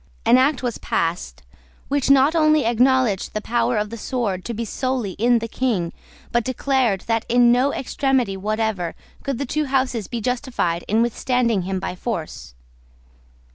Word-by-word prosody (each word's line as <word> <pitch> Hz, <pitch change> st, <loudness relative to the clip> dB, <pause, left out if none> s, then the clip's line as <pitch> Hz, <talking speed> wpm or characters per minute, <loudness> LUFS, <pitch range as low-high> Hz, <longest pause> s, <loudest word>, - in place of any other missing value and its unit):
An 230 Hz, +2 st, +6 dB
act 265 Hz, 0 st, +2 dB
was 245 Hz, -2 st, -2 dB
passed, 165 Hz, -, -2 dB, 0.4 s
which 280 Hz, -1 st, 0 dB
not 275 Hz, +2 st, +5 dB
only 310 Hz, -3 st, +4 dB
acknowledged 240 Hz, -4 st, +2 dB
the -, -, +1 dB
power 235 Hz, +1 st, 0 dB
of 210 Hz, 0 st, -2 dB
the 230 Hz, -, -7 dB
sword 210 Hz, -7 st, -2 dB
to 235 Hz, -, -3 dB
be 230 Hz, +2 st, -3 dB
solely 255 Hz, -2 st, -2 dB
in 240 Hz, +2 st, +4 dB
the 230 Hz, 0 st, -3 dB
King, 220 Hz, -9 st, -1 dB, 0.4 s
but 240 Hz, 0 st, +1 dB
declared 255 Hz, -5 st, 0 dB
that 225 Hz, -1 st, -1 dB
in 240 Hz, 0 st, +5 dB
no 255 Hz, +4 st, +3 dB
extremity 265 Hz, -6 st, 0 dB
whatever 210 Hz, -3 st, -2 dB, 0.3 s
could 275 Hz, -3 st, -3 dB
the 280 Hz, -, -2 dB
two 305 Hz, +4 st, -1 dB
Houses 260 Hz, -6 st, 0 dB
be 240 Hz, -, -4 dB
justified 240 Hz, -8 st, -1 dB
in 220 Hz, +3 st, +3 dB
withstanding 235 Hz, -2 st, 0 dB
him 190 Hz, -1 st, -1 dB
by 185 Hz, -, -4 dB
force. 160 Hz, -, -5 dB
235 Hz, 165 wpm, -22 LUFS, 210-260 Hz, 0.4 s, An